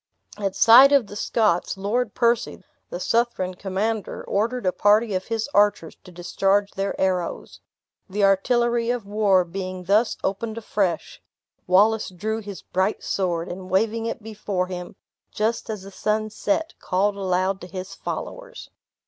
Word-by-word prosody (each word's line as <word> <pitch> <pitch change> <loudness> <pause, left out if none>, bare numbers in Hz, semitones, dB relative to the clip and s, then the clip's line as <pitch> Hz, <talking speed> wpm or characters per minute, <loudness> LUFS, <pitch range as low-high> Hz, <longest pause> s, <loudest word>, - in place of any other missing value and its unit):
At 195 -2 -3
sight 255 +5 +8
of 280 -5 +4
the 205 - -11
Scots, 210 -4 0
Lord 210 +3 -1
Percy, 235 -1 +1 0.3
the - - -5
Southron 230 -6 0
commander, 200 +4 -3
ordered 230 +3 -1
a 185 - +3
party 210 +3 +3
of 185 0 -2
his 225 +1 -2
archers 205 -5 +2
to 180 - -13
discharge 195 +3 0
their 195 +1 -3
arrows. 185 -2 -2 0.5
The 200 +2 -1
artillery 235 +4 +2
of 245 -4 -1
war 200 -3 +2
being 185 +1 -6
thus 210 +5 +2
opened 220 +3 -2
afresh, 195 -6 -2 0.5
Wallace 210 +4 +3
drew 215 +5 -3
his 200 -3 -9
bright 190 +3 -1
sword, 175 -3 -1
and 185 +1 -7
waving 225 +4 +1
it 230 -1 -5
before 205 -4 -3
him, 180 -1 -7 0.4
just 225 +2 -1
as 210 -3 -5
the 195 - -10
sun 215 +2 -1
set, 320 +11 -1
called 200 +2 0
aloud 190 0 -1
to 180 - -8
his 185 +2 -7
followers. - - -7
205 Hz, 150 wpm, -23 LUFS, 185-225 Hz, 0.5 s, sight